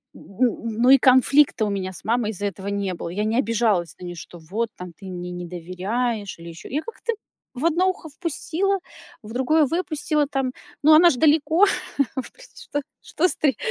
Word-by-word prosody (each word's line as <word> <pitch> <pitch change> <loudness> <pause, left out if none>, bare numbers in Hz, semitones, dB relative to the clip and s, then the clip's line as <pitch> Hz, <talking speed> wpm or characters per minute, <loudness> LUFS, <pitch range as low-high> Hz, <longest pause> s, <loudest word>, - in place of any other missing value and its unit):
н 230 +1 -2
Но 250 - +5
и 275 - +9
конфликта 260 0 +4
у - - -1
меня 190 -2 -3
с - - -9
мамой 230 -1 0
из-за 205 0 -3
этого 195 0 -7
не 200 -2 -1
было. 170 - -6
Я 195 +5 -2
не 220 +2 0
обижалась 215 - +1
на - - -10
нее, 175 0 -6
что 170 +1 -10
вот, 205 +9 -2
там 180 -1 -8
ты 200 - -13
мне 180 -1 -6
не 175 0 -6
доверяешь 190 +5 -3
или 170 0 -9
еще 165 - -10
Я 295 +4 -1
как-то 465 0 -4 0.4
в 260 +6 -3
одно 340 +3 +3
ухо 360 -3 -5
впустила, 345 +5 -1 0.4
в 215 - -10
другое 265 +6 +3
выпустила 305 -1 0
там. 270 -2 -1 0.3
Но 310 +2 +7
она 345 +3 +8
ж 290 - 0
далеко, 315 +6 +4 0.6
впри - - -13
что 290 - -4 0.2
что 360 - +1
стри 280 -9 +1
235 Hz, 195 wpm, -23 LUFS, 190-300 Hz, 0.6 s, и